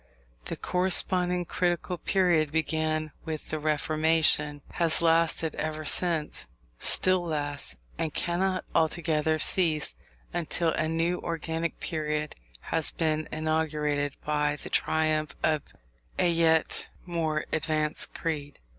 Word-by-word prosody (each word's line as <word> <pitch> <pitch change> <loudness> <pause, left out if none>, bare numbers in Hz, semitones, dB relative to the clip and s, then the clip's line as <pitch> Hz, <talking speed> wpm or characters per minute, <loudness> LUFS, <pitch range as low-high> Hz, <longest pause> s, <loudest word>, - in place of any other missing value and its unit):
The - - -3
corresponding 180 -1 +1
critical 175 0 -1
period 175 -6 +2
began 155 -1 0
with 155 -2 -5
the 155 - -1
Reformation, 155 -1 +2
has 170 -2 +1
lasted 165 -1 +2
ever 155 0 -3
since, 155 - 0 0.3
still 185 -1 +4
lasts, 145 - -2 0.2
and 160 -2 -1
cannot 185 +3 -1
altogether 160 -1 +1
cease 155 -2 +2 0.4
until 170 -1 0
a 155 - 0
new 165 +2 0
organic 165 0 -3
period 150 -2 -2 0.3
has 160 - 0
been 155 -1 -1
inaugurated 150 -2 0
by 150 -1 +1
the - - -9
triumph 155 -2 +1
of 155 -2 +2 0.6
a 175 - +3
yet 165 -1 +2 0.2
more 160 -3 -1
advanced 155 -1 0
creed. 145 -3 -3
160 Hz, 110 wpm, -28 LUFS, 155-170 Hz, 0.6 s, still